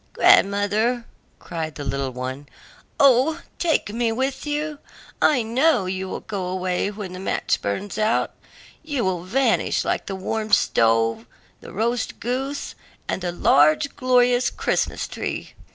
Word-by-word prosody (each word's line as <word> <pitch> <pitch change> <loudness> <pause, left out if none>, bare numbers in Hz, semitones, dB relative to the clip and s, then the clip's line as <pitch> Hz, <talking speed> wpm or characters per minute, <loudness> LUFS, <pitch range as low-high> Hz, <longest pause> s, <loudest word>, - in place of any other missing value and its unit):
"Grandmother," 210 +4 +3 0.3
cried 160 -2 -5
the 145 - -6
little 140 -1 -2
one, 130 +3 -6 0.5
"O 275 +4 +4 0.2
take 320 -11 +1
me 230 0 0
with 265 +4 -2
you; 295 0 -2 0.4
I 255 -6 +4
know 245 0 +2
you 185 +1 -3
will - - -5
go 195 -4 -4
away 185 +1 -1
when 205 -3 -7
the 185 - -7
match 190 - -1
burns 190 - -3
out; 215 +1 +1 0.5
you 290 -8 -2
will 185 -2 -1
vanish 260 +9 +1
like - - -1
the 195 - -3
warm 215 +3 -3
stove, 115 0 +3 0.3
the - - -11
roast 230 +4 -2
goose, 265 +4 -3 0.3
and - - -2
the 175 -1 -2
large, 155 - +3
glorious 250 -1 +3
Christmas - - -1
tree." - - -5
210 Hz, 140 wpm, -23 LUFS, 180-255 Hz, 0.5 s, O